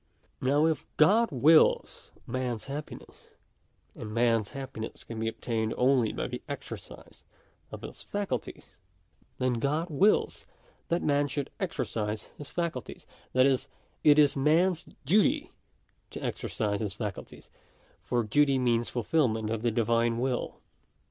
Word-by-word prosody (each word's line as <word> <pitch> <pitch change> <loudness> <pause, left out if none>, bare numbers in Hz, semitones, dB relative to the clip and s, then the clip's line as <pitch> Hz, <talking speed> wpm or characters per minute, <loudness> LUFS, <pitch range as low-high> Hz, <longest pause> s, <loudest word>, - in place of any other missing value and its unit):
§2 130 - -1
Now 145 +3 +4
if 160 -2 0
God 215 +9 +5
wills 150 +4 +3
man's* 125 -2 -3
happiness, 145 +2 -9 0.6
and 105 - -8
man's 115 -2 +2
happiness 135 -5 -7
can 115 -1 -7
be 110 - -1
obtained 115 -1 -2
only 125 -3 +3
by - - -3
the - - -5
exercise - - -9 0.5
of - - -8
his - - -8
faculties, 200 - -5 0.6
then 125 -2 0
God 155 +7 -1
wills 195 +9 +2 0.4
that 170 +1 0
man 145 -1 +2
should 140 0 -4
exercise 110 - -3
his 145 - -8
faculties; 170 -8 -4 0.3
that 130 0 +5
is, 135 -2 +2 0.4
it 150 -1 +6
is 145 -2 +5
man's 160 +5 +2 0.2
duty 270 - +3 0.6
to - - -7
exercise 105 -4 -2
his 105 -4 -3
faculties; 105 -2 -7 0.5
for 120 -1 0
duty 140 +5 +3
means 120 -2 +1
fulfilment 115 -3 0
of 115 -1 -2
the 120 - +2
Divine 115 +1 +1
will. 125 0 -2
130 Hz, 135 wpm, -29 LUFS, 115-150 Hz, 0.6 s, it